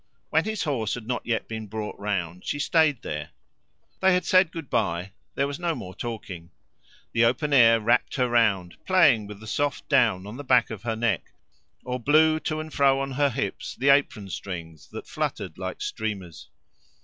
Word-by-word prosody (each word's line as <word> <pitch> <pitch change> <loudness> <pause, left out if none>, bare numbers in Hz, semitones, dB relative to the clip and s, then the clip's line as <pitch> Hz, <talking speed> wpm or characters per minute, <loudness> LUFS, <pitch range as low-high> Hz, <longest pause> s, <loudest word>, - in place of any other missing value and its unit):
When 160 +3 +3
his 220 -2 -2
horse 125 -9 -1
had 120 -3 -8
not 120 0 -3
yet 115 -2 -1
been 110 -1 -6
brought 105 +1 -5
round 90 -4 -3
she - - -2
stayed 150 -3 +2
there. 75 0 -5 0.7
They 190 0 +4
had 180 - 0
said 185 -2 +4
"Good 165 -4 -7
bye"; 90 -2 -1 0.2
there 140 - +1
was 140 +3 -5
no 170 -2 -1
more 95 -7 -8
talking. 95 -8 -7 0.6
The 115 - +3
open 130 +6 +1
air 115 -4 +7
wrapped 115 +3 +1
her 125 -3 +2
round, 105 -7 +1
playing 145 - +4
with 105 -1 -9
the 110 - -11
soft 145 +6 -2
down 115 -10 +3
on 105 +4 -8
the 145 - -6
back 125 -4 +3
of 110 -3 -6
her 115 -1 -2
neck, 115 -4 -1 0.5
or 125 0 -3
blew 155 +4 +4
to 155 0 -3
and 155 0 -7
fro 135 -1 +3
on 135 0 -3
her 140 +2 +2
hips 105 -5 -4
the 135 +3 +1
apron 125 -8 +2
strings, 85 -6 -7
that - - -8
fluttered - - -4
like - - -5
streamers. 95 -9 -5
120 Hz, 190 wpm, -25 LUFS, 105-145 Hz, 0.7 s, air